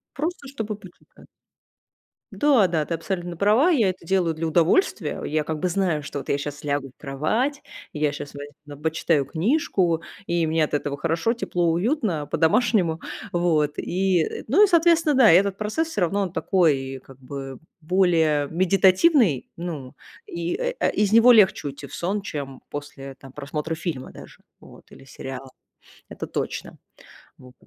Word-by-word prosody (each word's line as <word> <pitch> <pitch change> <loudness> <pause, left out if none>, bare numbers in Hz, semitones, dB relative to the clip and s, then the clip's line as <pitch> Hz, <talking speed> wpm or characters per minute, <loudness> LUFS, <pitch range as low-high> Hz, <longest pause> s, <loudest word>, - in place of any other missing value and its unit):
Просто, 310 0 -4
чтобы 220 -6 -5
почитать. 190 -3 -17 1.0
Да-да, 205 - +3
ты 165 - -2
абсолютно 175 0 -4
права. 215 - +4
Я 230 - +3
это 185 -2 -7
делаю 180 -2 +1
для 160 +1 -3
удовольствия. 165 - +1
Я, 155 0 -1
как 155 0 -4
бы, 180 - 0
знаю, 175 -5 0
что 145 0 -6
вот 135 - -9
я 140 - +2
щас 145 +1 -6
лягу 145 -2 -2
в - - -62
кровать, 215 - -1 0.3
и 150 - -7
я 150 -1 +2
щас 145 0 -8
возь 145 0 -8 0.2
на 145 -1 -10
ба 145 - -18
почитаю 160 -2 +1
книжку, 175 - 0 0.2
и 170 -2 0
мне 160 0 +1
от 150 - -3
этого 145 -1 -2
хорошо, 165 +8 0
тепло, 175 -7 -1
уютно, 190 - 0
по-домашнему, 165 - +2 0.3
вот. 160 -4 +1
И, 185 -2 +1
э, - - -5
ну 340 - +5
и, - - +6
соответственно, 335 -3 +3
да, 255 -7 +7
и - - +7
этот 195 0 +1
процесс, 215 +11 -2
всё 210 - -3
равно, 195 +4 +1
он 190 -4 -2
такой, 135 -10 +1
как 135 0 -16
бы, 135 0 -8 0.2
более 160 -4 +2
медитативный. 190 - +3
Ну 155 -7 -6 0.3
и, 170 0 -3
э, - - -2
а, - - +2
из 210 -1 0
него 230 +2 +8
легче 205 -9 +4
уйти 140 0 -7
в - - -15
сон, 195 +4 -2
чем 140 -8 -6
после, 140 -2 -8
там, 135 0 -14
просмотра 150 +3 -4
фильма 160 -6 -5
даже, - - -13 0.2
вот, - - -16
или - - -14
сериала. 135 0 -8 0.6
Это - - -6
точно, - - -5 0.6
вот. 125 -1 -16
170 Hz, 170 wpm, -23 LUFS, 145-205 Hz, 1.0 s, него